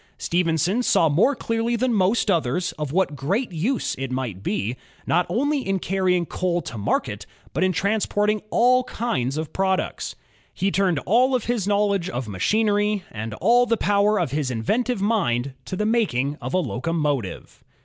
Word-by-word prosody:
Stephenson 175 Hz, -, +1 dB
saw 165 Hz, -9 st, +3 dB
more 195 Hz, -, +3 dB
cleariy 230 Hz, 0 st, -1 dB
than 255 Hz, 0 st, +1 dB
most 205 Hz, +2 st, +2 dB
others 170 Hz, 0 st, 0 dB
of 150 Hz, -3 st, -5 dB
what 185 Hz, -3 st, +1 dB
great 195 Hz, -, -1 dB
use 205 Hz, -, -1 dB
it 135 Hz, -1 st, -3 dB
might 125 Hz, -7 st, -3 dB
be, 105 Hz, +3 st, -2 dB, 0.3 s
not 175 Hz, -, +2 dB
only 285 Hz, +5 st, +1 dB
in 195 Hz, -5 st, -1 dB
carrying 185 Hz, -1 st, +1 dB
coal 175 Hz, +1 st, -1 dB
to 145 Hz, -, -7 dB
market, 100 Hz, -2 st, -2 dB, 0.3 s
but -, -, 0 dB
in 185 Hz, -, +3 dB
transporting 210 Hz, +2 st, 0 dB
all 255 Hz, +3 st, +4 dB
kinds 140 Hz, -, -2 dB
of 155 Hz, 0 st, -4 dB
products. 190 Hz, -1 st, -1 dB, 0.4 s
He 195 Hz, +1 st, 0 dB
turned 190 Hz, -5 st, +2 dB
all 255 Hz, +5 st, +4 dB
his 235 Hz, -4 st, -2 dB
knowledge 200 Hz, -3 st, +1 dB
of 125 Hz, -1 st, -4 dB
machinery, 205 Hz, -, +1 dB
and 110 Hz, 0 st, -5 dB
all 240 Hz, -, +3 dB
the 230 Hz, 0 st, +2 dB
power 205 Hz, +1 st, +2 dB
of 175 Hz, -, -1 dB
his 145 Hz, -2 st, -1 dB
inventive 215 Hz, -, -1 dB
mind, 140 Hz, -, 0 dB
to -, -, -4 dB
the 210 Hz, -, -1 dB
making 150 Hz, -, +1 dB
of -, -, -3 dB
a -, -, +4 dB
locomotive. 145 Hz, -, -2 dB
185 Hz, 165 wpm, -23 LUFS, 145-215 Hz, 0.4 s, all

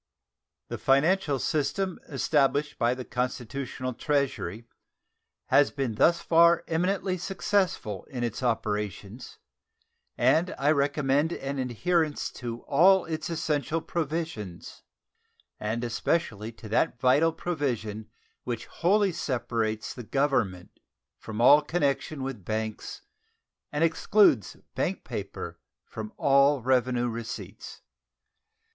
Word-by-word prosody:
The -, -, -5 dB
financial 145 Hz, +2 st, +3 dB
system 175 Hz, +7 st, -1 dB
established 145 Hz, 0 st, +1 dB
by 120 Hz, 0 st, +2 dB
the 130 Hz, -1 st, -7 dB
constitutional 125 Hz, +1 st, -3 dB
treasury 130 Hz, -, -1 dB, 0.8 s
has 145 Hz, -1 st, +5 dB
been 135 Hz, -5 st, -2 dB
thus 170 Hz, +10 st, +3 dB
far 170 Hz, 0 st, +5 dB
eminently 185 Hz, +2 st, 0 dB
successful 185 Hz, -, -1 dB
in 125 Hz, -3 st, -5 dB
its 120 Hz, 0 st, -3 dB
operations, 105 Hz, -1 st, -3 dB, 0.8 s
and 160 Hz, +9 st, +2 dB
I 145 Hz, +2 st, +3 dB
recommend 145 Hz, +1 st, +1 dB
an 140 Hz, -2 st, -4 dB
adherence 150 Hz, +5 st, 0 dB
to 120 Hz, -1 st, -5 dB
all 185 Hz, +6 st, +5 dB
its 160 Hz, 0 st, -4 dB
essential 155 Hz, -1 st, -1 dB
provisions, 155 Hz, -, -4 dB, 0.8 s
and 110 Hz, +3 st, -2 dB
especially 115 Hz, -2 st, -1 dB
to 110 Hz, -1 st, -11 dB
that 115 Hz, +2 st, +1 dB
vital 145 Hz, +6 st, +4 dB
provision 120 Hz, -11 st, -3 dB, 0.3 s
which 120 Hz, -2 st, -4 dB
wholly 195 Hz, +6 st, +2 dB
separates 115 Hz, -8 st, -2 dB
the 125 Hz, -, -8 dB
Government 120 Hz, -8 st, -1 dB, 0.4 s
from 110 Hz, 0 st, -7 dB
all 140 Hz, +5 st, +7 dB
connection 150 Hz, -2 st, -1 dB
with 130 Hz, -7 st, -5 dB
banks 110 Hz, +2 st, -4 dB, 0.7 s
and 150 Hz, +2 st, 0 dB
excludes 165 Hz, -, +3 dB, 0.2 s
bank -, -, -2 dB
paper -, -, -6 dB, 0.3 s
from 110 Hz, -1 st, -7 dB
all 140 Hz, -1 st, +4 dB
revenue 125 Hz, -1 st, +2 dB
receipts. 115 Hz, -1 st, -7 dB
135 Hz, 105 wpm, -27 LUFS, 115-160 Hz, 0.8 s, all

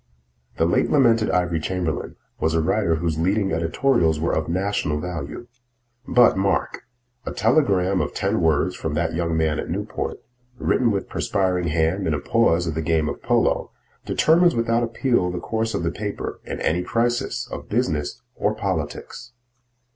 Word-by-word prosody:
The 80 Hz, -, +3 dB
late 85 Hz, -, +2 dB
lamented 115 Hz, -6 st, +4 dB
Ivory 90 Hz, -2 st, +1 dB
Chamberlain 85 Hz, -1 st, -3 dB, 0.2 s
was 80 Hz, 0 st, +1 dB
a -, -, +3 dB
writer 85 Hz, +1 st, +1 dB
whose 80 Hz, -1 st, -2 dB
leading 95 Hz, +3 st, +1 dB
editorials 80 Hz, -, +1 dB
were 85 Hz, -, 0 dB
of 80 Hz, 0 st, -1 dB
national 90 Hz, -4 st, -1 dB
value. 80 Hz, +4 st, -5 dB, 0.6 s
But, 125 Hz, -1 st, +5 dB
mark: 95 Hz, 0 st, -1 dB, 0.4 s
a -, -, -4 dB
telegram 95 Hz, -10 st, +2 dB
of -, -, -2 dB
ten -, -, 0 dB
words 80 Hz, +3 st, +2 dB
from 80 Hz, -2 st, -3 dB
that 80 Hz, 0 st, 0 dB
young 85 Hz, -1 st, -1 dB
man 80 Hz, -2 st, +1 dB
at -, -, -5 dB
Newport, -, -, -3 dB, 0.4 s
written 120 Hz, -1 st, +2 dB
with 100 Hz, -2 st, -1 dB
perspiring 90 Hz, -3 st, 0 dB
hand 80 Hz, +4 st, 0 dB
in 80 Hz, -, +1 dB
a -, -, -2 dB
pause 90 Hz, -4 st, +2 dB
of 80 Hz, -, -2 dB
the 80 Hz, -, -2 dB
game 80 Hz, -1 st, +1 dB
of -, -, -6 dB
polo, -, -, +1 dB, 0.3 s
determines 170 Hz, +2 st, +3 dB
without 115 Hz, 0 st, +1 dB
appeal 120 Hz, -4 st, +1 dB
the 90 Hz, -, -4 dB
course 110 Hz, +4 st, -2 dB
of -, -, -2 dB
the 85 Hz, -, 0 dB
paper 105 Hz, +1 st, -5 dB
in -, -, -5 dB
any 85 Hz, +3 st, +1 dB
crisis 120 Hz, +4 st, -1 dB
of -, -, -7 dB
business 85 Hz, -, -1 dB
or -, -, -1 dB
politics. 125 Hz, 0 st, -4 dB
90 Hz, 165 wpm, -23 LUFS, 80-115 Hz, 0.6 s, But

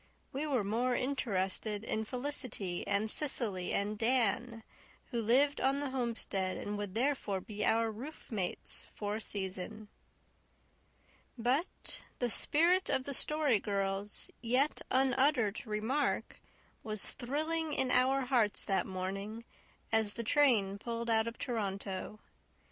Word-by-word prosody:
We 285 Hz, +3 st, -2 dB
were 260 Hz, -7 st, +1 dB
more 240 Hz, +5 st, 0 dB
interested 210 Hz, -5 st, -1 dB
in 220 Hz, -1 st, -2 dB
Felicity 250 Hz, -8 st, -4 dB
and 200 Hz, +2 st, +1 dB
Cecily 215 Hz, -8 st, +7 dB
and 205 Hz, +1 st, -1 dB
Dan, 230 Hz, -1 st, +1 dB, 0.5 s
who 235 Hz, -2 st, -1 dB
lived 270 Hz, +6 st, +3 dB
on 270 Hz, +1 st, +2 dB
the 285 Hz, -2 st, -3 dB
homestead 230 Hz, -7 st, -2 dB
and 205 Hz, -, -4 dB
would 205 Hz, -1 st, -5 dB
therefore 240 Hz, -6 st, 0 dB
be 210 Hz, +2 st, -5 dB
our 225 Hz, 0 st, +2 dB
roofmates 220 Hz, -, -4 dB
for 205 Hz, 0 st, -3 dB
a -, -, -5 dB
season. 200 Hz, +2 st, -4 dB, 1.5 s
But 255 Hz, +9 st, -2 dB, 0.2 s
the 245 Hz, -2 st, 0 dB
spirit 345 Hz, -, +3 dB
of 260 Hz, -, +1 dB
the 280 Hz, -, -4 dB
Story 295 Hz, -5 st, +2 dB
Girl's 195 Hz, 0 st, -2 dB
yet 255 Hz, +5 st, +1 dB
unuttered 260 Hz, -4 st, +2 dB
remark 220 Hz, +7 st, -1 dB, 0.4 s
was 215 Hz, -2 st, -1 dB
thrilling 310 Hz, +5 st, -2 dB
in 265 Hz, -3 st, 0 dB
our 260 Hz, +2 st, +3 dB
hearts 245 Hz, -5 st, +2 dB
that 195 Hz, -3 st, 0 dB
morning, 195 Hz, +4 st, -5 dB, 0.5 s
as 220 Hz, -2 st, +2 dB
the 235 Hz, -, -3 dB
train 220 Hz, -7 st, +3 dB
pulled 235 Hz, +1 st, -3 dB
out 220 Hz, 0 st, +2 dB
of 230 Hz, -, -5 dB
Toronto. 200 Hz, -4 st, -4 dB
230 Hz, 125 wpm, -33 LUFS, 205-265 Hz, 1.5 s, Cecily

